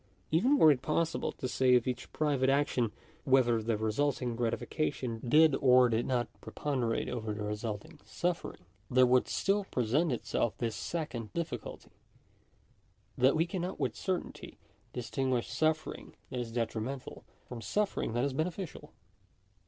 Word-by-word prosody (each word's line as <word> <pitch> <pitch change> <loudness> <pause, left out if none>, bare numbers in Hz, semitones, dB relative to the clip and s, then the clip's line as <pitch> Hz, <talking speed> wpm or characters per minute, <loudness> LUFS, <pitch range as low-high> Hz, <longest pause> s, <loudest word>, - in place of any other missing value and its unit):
Even 245 - +4
were 155 - +8
it 130 -3 0
possible 160 +4 0
to 130 - -4
say 125 0 +3
of 120 - +3
each 125 -1 -4
private 140 -4 +1
action 135 -5 +2 0.3
whether 125 -5 +3
the 110 0 0
resulting 120 +3 0
gratification 120 +1 -2
did 155 +5 +5
or 125 -2 +6
did 115 +1 0
not 125 -2 0
preponderate 125 -6 -2
over 110 -3 -3
the 105 - -4
resulting 105 +6 -5
suffering, 175 - -3 0.2
there 130 0 +5
would 125 0 +3
still 200 +1 +1
present 135 - +1
itself 120 -1 -1
this 115 -3 -2
second 120 - -4
difficulty, 165 -10 -5 1.2
that 130 +2 +4
we 160 +1 +3
cannot 180 +1 -4
with - - -1
certainty 185 -2 -4 0.3
distinguish 125 0 -1
suffering 155 0 -1 0.2
that 125 - -3
is 120 -2 -4
detrimental, 120 +3 -4 0.2
from 120 -2 -7
suffering 205 - -1
that 120 +1 +1
is 140 -1 0
beneficial. 160 0 -4
130 Hz, 140 wpm, -31 LUFS, 120-155 Hz, 1.2 s, were